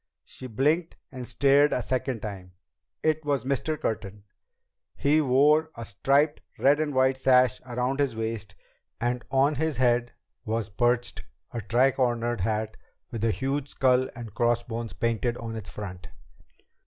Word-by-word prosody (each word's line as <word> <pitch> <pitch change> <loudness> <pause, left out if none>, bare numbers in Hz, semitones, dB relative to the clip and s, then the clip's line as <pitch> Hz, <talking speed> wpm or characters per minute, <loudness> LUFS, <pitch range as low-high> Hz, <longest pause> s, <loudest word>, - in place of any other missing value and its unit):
She 130 - -9
blinked 150 +9 0 0.2
and 130 -3 -7
stared 140 +1 +4
a 125 - 0
second 130 +1 -2
time. 95 -4 -7 0.5
It 155 0 +1
was 145 -2 0
Mr. 140 +3 -1
Curtin! 105 -2 -4 0.7
He 150 +2 +3
wore 150 +4 +4
a 115 - -6
striped 140 +9 +1 0.2
red 145 +2 +4
and 150 -3 -1
white 130 0 +3
sash 130 -2 +4
around 125 +3 -1
his 140 -5 +1
waist, 110 -4 -4 0.4
and 120 +1 -1
on 135 +2 +3
his 160 0 -1
head 120 -1 +2 0.3
was 110 -1 -2
perched 120 +4 0 0.3
a 120 - -3
tricornered 120 0 +1
hat 110 +2 -2 0.3
with 115 -3 -4
a 115 - +3
huge 135 +4 -1
skull 130 -1 +2
and 115 -5 -8
crossbones 120 -1 -1
painted 115 +1 -1
on 115 -1 -6
its 105 -3 -6
front. 90 -5 -7
125 Hz, 145 wpm, -27 LUFS, 115-135 Hz, 0.7 s, stared